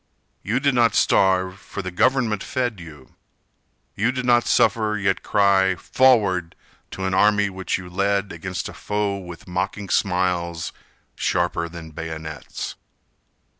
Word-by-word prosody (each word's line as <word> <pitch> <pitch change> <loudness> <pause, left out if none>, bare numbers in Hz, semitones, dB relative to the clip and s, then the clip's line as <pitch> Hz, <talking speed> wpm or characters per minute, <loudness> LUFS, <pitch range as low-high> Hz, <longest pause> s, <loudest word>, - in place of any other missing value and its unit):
You 115 +5 0
did 140 -1 +2
not 120 -3 +3
starve, 95 0 +3
for - - -7
the 90 - -4
government 115 0 +2
fed 120 -6 -2
you. 75 -5 -13 0.8
You 115 +5 +1
did 125 -1 -3
not 120 -1 +4
suffer 105 -1 +2
yet 95 -1 0
cry 95 -2 +3
"forward" 95 -6 +2 0.4
To 95 - -3
an 95 - -1
army 105 +1 +3
which 95 0 -2
you 90 -1 -9
led 100 +2 0
Against 95 -1 -5
a - - -9
foe 105 -1 -2
with 90 -3 -10
mocking 90 +2 -3
smiles, 90 -3 0 0.4
Sharper 85 -1 -1
than 85 -1 -9
bayonets. 80 -1 -6
95 Hz, 135 wpm, -22 LUFS, 90-105 Hz, 0.8 s, not